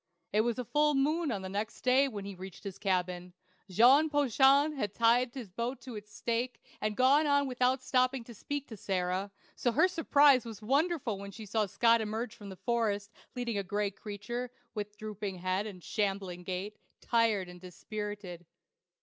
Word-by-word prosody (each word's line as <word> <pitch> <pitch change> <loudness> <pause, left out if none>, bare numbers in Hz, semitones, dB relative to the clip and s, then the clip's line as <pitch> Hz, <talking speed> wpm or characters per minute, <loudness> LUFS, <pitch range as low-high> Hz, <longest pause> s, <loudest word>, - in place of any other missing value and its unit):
It 210 - +4
was 235 +2 -1
full 300 0 +4
noon 305 +4 +1
of 200 -4 -3
the - - -4
next 205 +3 -4
day 260 +2 +4
when 205 -6 -6
he 200 - -6
reached 190 -1 -10
his 200 -3 -7
cabin. 180 -2 -1 0.4
Jean 255 - +6
Poiton 285 +1 +4
had 210 -7 -3
tied 235 +2 +3
his 235 -8 -7
boat 235 +7 -3
to 250 -4 -8
its 210 0 -9
stake, 240 +3 -2 0.2
and 215 -1 -1
gone 280 +4 +5
on 285 -1 +3
without 255 +1 +1
stopping 255 -1 +1
to 235 - -11
speak 285 +6 -5
to 220 - -8
Sarah; 185 0 -1 0.3
so 245 - +1
her 365 - +5
surprise 290 -7 +4
was 225 -3 -8
wonderful 270 - 0
when 200 0 -7
she 215 +2 -9
saw 210 +1 0
Scott 230 +3 +4
emerge 220 +2 -3
from 205 -3 -10
the 190 - -8
forest, 215 -2 -1 0.2
leading 235 -4 -2
a - - -2
gray 205 +1 -1
creature, 215 +5 -5 0.2
with 210 -1 -5
drooping 210 -3 -5
head 185 +3 -1
and 185 -4 -10
shambling 195 -4 -2
gait, 185 +3 -5 0.2
tired 225 -5 +2
and 180 0 -12
dispirited. 190 -2 -7
220 Hz, 180 wpm, -31 LUFS, 200-255 Hz, 0.4 s, Jean